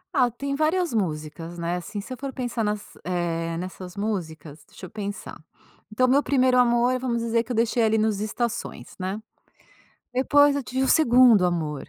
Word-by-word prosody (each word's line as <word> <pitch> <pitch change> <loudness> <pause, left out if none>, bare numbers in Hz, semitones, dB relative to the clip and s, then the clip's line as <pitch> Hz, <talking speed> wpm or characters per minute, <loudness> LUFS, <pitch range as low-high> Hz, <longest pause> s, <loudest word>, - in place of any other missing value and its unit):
Ah, 250 -4 +4
tem 275 +4 -4
várias 320 0 +1
músicas, 165 -3 -3
né, 170 +1 -2
assim 205 +4 -6
se 235 +6 -7
eu 255 - -8
for 275 0 -5
pensar 245 -3 -3
nas 210 0 -3
eh, 170 -2 -2
nessas 185 +1 -7
músicas, 160 -7 -4
deixa 185 - -11
eu - - -10
pensar, 200 -6 -7 0.5
então 255 +4 +2
meu 270 +3 +4
primeiro 260 -3 +2
amor, 245 +1 +3
vamos 235 -2 -2
dizer 230 0 +1
que 240 - -9
eu 245 - -1
deixei 230 +1 +1
ali 220 0 +3
nos 215 -2 +1
estações, 225 +2 -4
né, 190 +3 -3 0.9
depois 285 +2 +4
eu 280 - -3
tive 260 +2 -2
o 265 - +1
segundo 245 - +6
amor. 155 -5 -2
220 Hz, 180 wpm, -24 LUFS, 180-255 Hz, 0.9 s, segundo